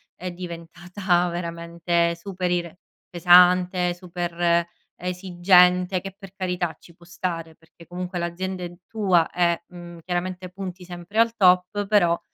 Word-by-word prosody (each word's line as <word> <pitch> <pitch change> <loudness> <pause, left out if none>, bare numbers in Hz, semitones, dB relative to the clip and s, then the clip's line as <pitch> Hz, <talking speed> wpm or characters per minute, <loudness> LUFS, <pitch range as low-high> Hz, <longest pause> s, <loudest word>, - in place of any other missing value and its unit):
è 185 0 -6
diventata 175 +1 -2
veramente 170 0 -1
super 180 +1 -4
ire 175 0 -2 0.3
pesante, 180 0 +4
super 175 -1 -1 0.3
esigente 180 0 +3
che, 195 0 -8
per 195 -2 -13
carità, 180 -3 -2
ci 170 - -18
può 170 - -19
stare, 170 -2 -5
perché 165 +1 -19
comunque 180 +1 -6
l'azienda 180 +2 -4
è 175 - -5 0.2
tua 190 -7 +2
e, 170 -1 +1
mhmm, 175 -1 -11
chiaramente 180 +1 -3
punti 185 -1 -8
sempre 175 +4 -5
al 230 0 +3
top 185 0 +3
però, 180 -5 +3
180 Hz, 130 wpm, -24 LUFS, 170-185 Hz, 0.3 s, pesante